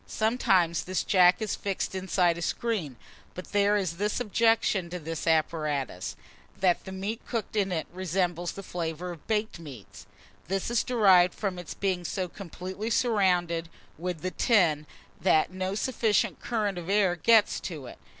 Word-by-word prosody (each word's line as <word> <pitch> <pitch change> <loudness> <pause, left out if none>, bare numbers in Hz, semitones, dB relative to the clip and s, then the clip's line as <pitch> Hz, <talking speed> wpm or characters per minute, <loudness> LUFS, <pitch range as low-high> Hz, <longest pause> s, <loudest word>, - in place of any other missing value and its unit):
Sometimes 190 -7 +1
this 185 0 -1
jack 185 +3 +4
is 215 - -2
fixed 195 -1 -3
inside 185 -2 +1
a 170 - -7
screen; 185 - -2 0.4
but 180 - -8
there 205 0 +3
is 180 -4 -2
this 205 +4 -1
objection 225 -5 +2
to 180 - -4
this 165 0 -5
apparatus, 150 - 0 0.4
that 180 -2 +2
the 190 - -7
meat 200 +4 -4
cooked 225 -3 -3
in 195 -3 +1
it 160 -3 -1
resembles 175 -1 -1
the 195 - -8
flavour 175 0 -4
of 165 -4 -12
baked 215 -4 -1
meat. 135 -11 -11 0.4
This 195 +5 -2
is 235 - +2
derived 190 -7 +4
from 190 -4 -3
its 175 - -7
being 185 -3 -1
so 185 +2 -2
completely 190 +3 -6
surrounded 180 -8 +1 0.3
with 175 -1 -4
the 185 - -2
tin, 165 -11 +2 0.3
that 165 -3 +3
no 185 +1 -2
sufficient 220 -2 +1
current 210 -6 -1
of 175 +1 -8
air 195 -3 +3
gets 220 +4 +4
to 155 -8 -6
it. - - -11
185 Hz, 160 wpm, -28 LUFS, 170-205 Hz, 0.4 s, jack